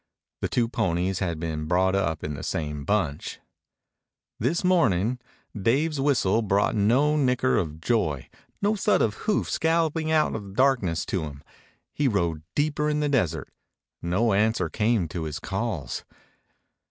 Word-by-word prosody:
The - - -2
two 120 -2 +1
ponies 95 -3 0
had 85 -5 -2
been 80 -2 -3
brought 95 +2 +2
up 85 -5 0
in 75 - -3
the 70 - -6
same 75 -2 -3
bunch. 85 -8 -1 1.0
This 145 - 0
morning 125 - +2 0.4
Dave's 135 +8 +1
whistle 120 -7 +2
brought 100 -1 +1
no 125 +9 +3
nicker 130 -3 +2
of 80 -2 -2
joy, 80 - 0 0.4
no 210 +2 +3
thud 210 +1 +2
of 105 - +1 0.2
hoofs 210 - 0
galloping 160 -1 +1
out 155 -1 +3
of 110 - -4
the 100 -1 -11
darkness 110 -10 +2
to 95 - -1
him. 70 -1 -9 0.5
He 145 - +1
rode 85 -9 0
deeper 150 0 +1
into 150 0 0
the 145 - +1
desert. 115 - 0 0.5
No 100 +6 +1
answer 105 -4 +2
came 110 -3 +1
to 80 0 -4
his 75 -1 -4
calls. 95 - -3
105 Hz, 155 wpm, -26 LUFS, 85-135 Hz, 1.0 s, no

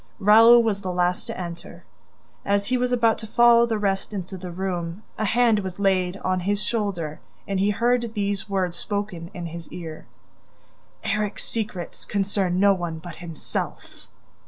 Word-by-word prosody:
Raoul 225 +4 +7
was 205 -3 0
the 185 - -3
last 180 0 0
to - - -5
enter. 170 -1 -7 0.6
As 200 0 +1
he 255 - 0
was 250 0 0
about 230 -2 +3
to 220 - -7
follow 235 +1 +5
the 225 -2 0
rest 195 0 -1
into 190 0 -5
the 180 -1 -7
room, 175 +1 -4 0.2
a 215 - +1
hand 230 0 +3
was 190 -3 -5
laid 190 -2 +1
on 185 0 +1
his 205 +3 -1
shoulder 190 -9 -2 0.3
and 195 -1 -1
he 200 +2 +3
heard 235 +1 +1
these 205 0 -1
words 185 -3 0
spoken 200 -3 -4
in 175 -2 -5
his 170 0 -8
ear: 160 -3 -8 1.0
"ERIK'S 210 -1 -1
SECRETS 210 -6 -4
CONCERN 195 -3 0
NO 200 0 +6
ONE 175 -3 -4
BUT 170 0 -9
HIMSELF!" 165 -3 -6
195 Hz, 165 wpm, -24 LUFS, 180-215 Hz, 1.0 s, Raoul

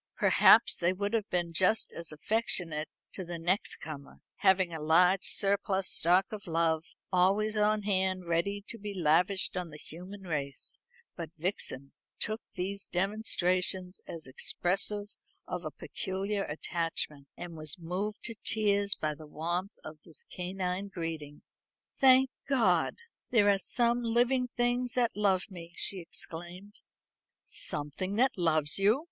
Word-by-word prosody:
Perhaps - - +6
they 175 +1 +2
would 200 +3 -2
have 215 -2 0
been 175 -2 -1
just 190 +6 +2
as 170 -1 -5
affectionate 165 -3 0 0.2
to 190 - -5
the 170 -1 -5
next 175 +5 0
comer, 145 -3 -9 0.2
having 190 -3 +3
a 160 - -5
large 180 +5 +4
surplus 195 -1 +1
stock 180 +3 +4
of 210 -3 -7
love 165 -1 +1 0.3
always 200 +4 +3
on 210 0 +2
hand 190 -2 0
ready 170 +4 0
to 230 - -7
be 205 0 -6
lavished 180 +4 +2
on 180 -2 -3
the 150 - -10
human 185 +6 -10
race; 145 -6 -3 0.4
but 165 -3 -5
Vixen 150 -6 -3 0.3
took 215 +1 -2
these 195 +2 -3
demonstrations 185 -1 0
as 165 -1 -7
expressive 195 +9 0 0.4
of 180 -1 -4
a 155 - -3
peculiar 195 +5 -3
attachment, 155 -2 -3
and 175 -1 -7
was 155 0 -1
moved 185 +6 -4
to 230 - -2
tears 205 -2 +2
by 155 -1 -2
the 150 +1 -12
warmth 175 +7 -3
of 155 0 -9
this 165 - -8
canine 185 +1 -3
greeting. 165 -5 -6 0.6
"Thank 265 -1 +6 0.2
God! 260 -5 +3 0.3
there 220 -4 +4
are 195 - +2
some 240 +4 +1
living 245 +2 +2
things 245 0 +1
that 245 -2 +1
love 195 -3 +2
me," 170 -2 -10
she 195 - 0
exclaimed. 175 +4 -8 0.7
"Something 150 +7 -2
that 260 +4 +3
loves 155 -3 +1
you!" 210 +6 +4
185 Hz, 140 wpm, -31 LUFS, 165-205 Hz, 0.7 s, Perhaps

